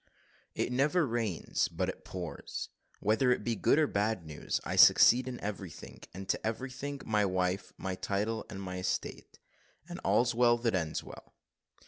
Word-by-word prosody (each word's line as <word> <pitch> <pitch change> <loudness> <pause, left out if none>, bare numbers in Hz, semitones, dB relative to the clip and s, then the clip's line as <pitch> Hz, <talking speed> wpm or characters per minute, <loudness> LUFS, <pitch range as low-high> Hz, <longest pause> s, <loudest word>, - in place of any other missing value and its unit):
IT - - -1
NEVER 150 +7 +2
RAINS 115 - -1
BUT - - -2
IT - - -6
POURS, 90 -3 -6 0.3
WHETHER 110 +5 +3
IT - - -4
BE 115 - 0
GOOD 125 - +3
OR 155 - +5
BAD 105 - -1
NEWS 75 -1 -3
I - - -3
SUCCEED 125 +2 +7
IN 125 -1 -5
EVERYTHING, 100 -5 -7
AND 95 +1 -8
TO - - -1
EVERYTHING, 130 +5 -4
MY 105 -2 +2
WIFE, 90 0 -1
MY 95 - -3
TITLE, 105 +4 -2
AND 95 0 -6
ESTATE 90 0 -4 0.5
AND 175 +1 -7
"ALL'S 120 0 +3
WELL 120 0 +4
THAT 115 -2 0
ENDS 80 -4 -1
WELL." - - -13
110 Hz, 160 wpm, -31 LUFS, 95-125 Hz, 0.5 s, SUCCEED